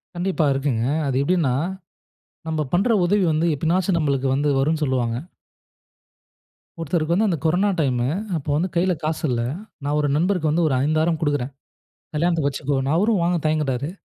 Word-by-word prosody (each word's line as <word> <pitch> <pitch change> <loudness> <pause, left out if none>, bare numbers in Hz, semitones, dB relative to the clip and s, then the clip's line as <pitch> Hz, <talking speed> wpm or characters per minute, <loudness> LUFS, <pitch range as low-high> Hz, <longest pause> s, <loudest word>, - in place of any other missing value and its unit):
கண்டிப்பா, 175 -2 0
இருக்குங்க. 135 -4 -1 0.2
அது 135 - -1
எப்படின்னா, 165 -5 +1 0.9
நம்ப 160 -1 -1
பண்ணுற 200 +7 +3
உதவி 195 +2 +2
வந்து 155 +2 +1
எப்பனாச்சு 175 +5 +1
நம்மளுக்கு 140 -4 0
வந்து 145 +2 +1
வரும்னு 155 +3 +1
சொல்வாங்க. 125 -4 0 1.6
ஒருத்தருக்கு 165 0 0
வந்து 215 +5 +2
அந்த 170 - 0
கொரோனா 180 +6 +2
டைம், 130 -5 +1 0.4
அப்போ 145 0 -6
வந்து 175 +5 0
கையில் 175 -1 +1
காசு 155 +1 -2
இல்ல. 120 -2 0 0.4
நான் 145 +1 0
ஒரு 150 - +1
நண்பருக்கு 170 -1 +1
வந்து 170 +3 +2
ஒரு 140 - 0
5000 155 +2 +1
குடுக்குறேன், 145 -4 -1 0.6
கல்யாணத்துக்கு 160 -2 +1
வச்சுக்கோ, 135 +1 -2 0.2
அவரும் 205 +3 +2
வாங்க 175 0 +1
தயங்குகிறாரு. 145 -3 0
155 Hz, 150 wpm, -22 LUFS, 140-175 Hz, 1.6 s, பண்ணுற